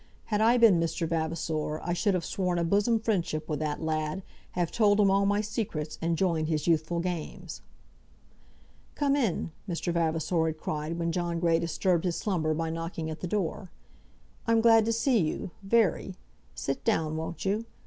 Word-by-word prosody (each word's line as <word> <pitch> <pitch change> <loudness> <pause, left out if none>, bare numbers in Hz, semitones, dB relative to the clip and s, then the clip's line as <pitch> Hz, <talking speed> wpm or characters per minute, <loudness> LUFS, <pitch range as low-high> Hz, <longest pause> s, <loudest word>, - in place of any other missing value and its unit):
Had 210 - +2
I 235 +3 +5
been 225 -7 +6
Mr. 165 0 -1
Vavasor 160 -1 -2
I 175 - -1
should 185 +3 +1
have 175 - -2
sworn 180 -2 -1
a 170 - +1
bosom 205 +6 +2
friendship 175 -8 -1
with 150 - -2
that 150 0 -2
lad, 155 +3 -2 0.3
have 175 -2 -1
told 210 -2 +3
him 200 -2 +5
all 200 0 +3
my 205 +1 +2
secrets, 180 -8 -4
and 165 0 0
joined 165 -4 +1
his 155 -2 -1
youthful 165 0 +1
games. 175 - -5 1.3
"Come 285 -1 +2
in!" 215 - 0 0.2
Mr. 170 0 -2
Vavasor 165 0 +1
had 160 -1 -3
cried 155 +1 -3
when 170 0 -1
John 170 -1 -1
Grey 165 -1 +3
disturbed 170 +1 0
his 175 -2 0
slumber 160 -7 0
by 165 0 -2
knocking 165 -1 -4
at 155 - -6
the 180 - -4
door. 185 0 -2 0.8
"I'm 230 0 +4
glad 225 -1 +6
to 230 - +1
see 230 +1 +2
you, 165 +1 -2
very. 195 -2 +1 0.4
Sit 135 - -3
down; 155 -1 +1
won't 160 +3 -5
you? 210 +4 0
170 Hz, 180 wpm, -28 LUFS, 160-200 Hz, 1.3 s, been